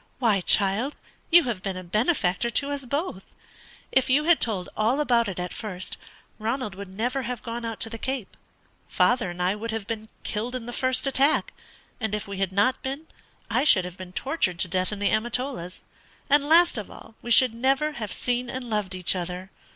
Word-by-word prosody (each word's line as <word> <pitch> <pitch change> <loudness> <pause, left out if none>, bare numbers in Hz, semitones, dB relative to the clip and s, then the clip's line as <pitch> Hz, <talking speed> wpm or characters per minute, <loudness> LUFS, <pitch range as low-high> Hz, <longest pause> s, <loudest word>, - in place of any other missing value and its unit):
"Why, 220 -6 +2
child, 205 +9 +2 0.3
you 345 0 +8
have 235 -8 -3
been 190 -1 -3
a 185 - -6
benefactor 215 - +1
to 280 +4 -1
us 280 -2 -3
both! 280 - -3 0.7
If 265 -1 +2
you 280 +4 +4
had 335 +1 +5
told 195 -6 0
all 225 +6 +1
about 240 -6 +3
it 190 - -5
at 180 0 -4
first, 190 -4 -5 0.4
Ronald 225 -1 -2
would 195 0 -9
never 245 +7 -1
have 250 -1 -5
gone 235 0 -5
out 225 -1 -4
to 225 - 0
the 230 - -6
Cape; 260 -5 -3 0.5
father 240 -6 +2
and 175 0 -8
I 180 +2 +2
would 220 +2 -5
have 220 -2 -3
been 220 0 -5
killed 230 +4 -3
in 245 -3 -5
the 240 - -6
first 255 +2 +1
attack; 275 +3 +3 0.5
and 220 -3 -1
if 210 - -5
we 200 -1 -6
had 195 -1 0
not 205 +7 +2
been, 275 +4 -4 0.4
I - - +1
should 190 -11 +5
have 180 0 -8
been 185 -1 -8
tortured 190 - -1
to - - +4
death 185 +2 0
in 210 - -4
the 200 0 +1
Amatolas; 240 -4 -1 0.5
and, 290 0 +5
last 335 -6 +5
of 205 - -7
all, - - -13
we 240 - -7
should 245 0 +6
never 270 +5 +1
have 225 -8 -5
seen 245 0 -1
and 250 -2 -5
loved 205 -3 -1
each 185 0 0
other. 180 +1 -5
230 Hz, 205 wpm, -25 LUFS, 195-260 Hz, 0.7 s, you